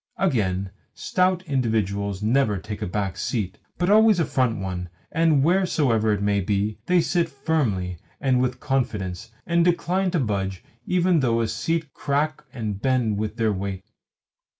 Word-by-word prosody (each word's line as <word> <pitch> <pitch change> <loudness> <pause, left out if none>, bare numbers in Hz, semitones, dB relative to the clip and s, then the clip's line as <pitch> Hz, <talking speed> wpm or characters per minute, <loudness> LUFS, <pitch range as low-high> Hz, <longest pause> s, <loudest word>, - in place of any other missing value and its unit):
Again, 100 - 0 0.2
stout 185 0 +1
individuals 105 - -1
never 110 -2 +2
take 105 +3 -7
a - - -2
back 95 0 -2
seat, 105 -7 -2 0.2
but 180 +2 +1
always 215 -2 +6
a 165 - +2
front 125 -5 +1
one, 90 -2 -4 0.2
and, 160 -4 +3
wheresoever 145 - +2
it 100 -1 +1
be, 105 +1 0
they 180 -1 +4
sit 170 0 +1
firmly, 120 - -1 0.2
and 130 -2 +2
with 125 -1 -1
confidence, 105 -10 -2 0.2
and 170 0 +2
decline 180 +2 +1
to 175 -2 0
budge 95 -6 -2 0.2
even 180 -1 +3
though 115 -4 +2
the 115 - +1
seat 155 +7 -2
crack 150 +2 -1
and 110 -6 -4
bend 120 -5 +1
with 110 0 -3
their 110 -3 +2
weight. 95 -1 -4
120 Hz, 150 wpm, -24 LUFS, 100-165 Hz, 0.2 s, always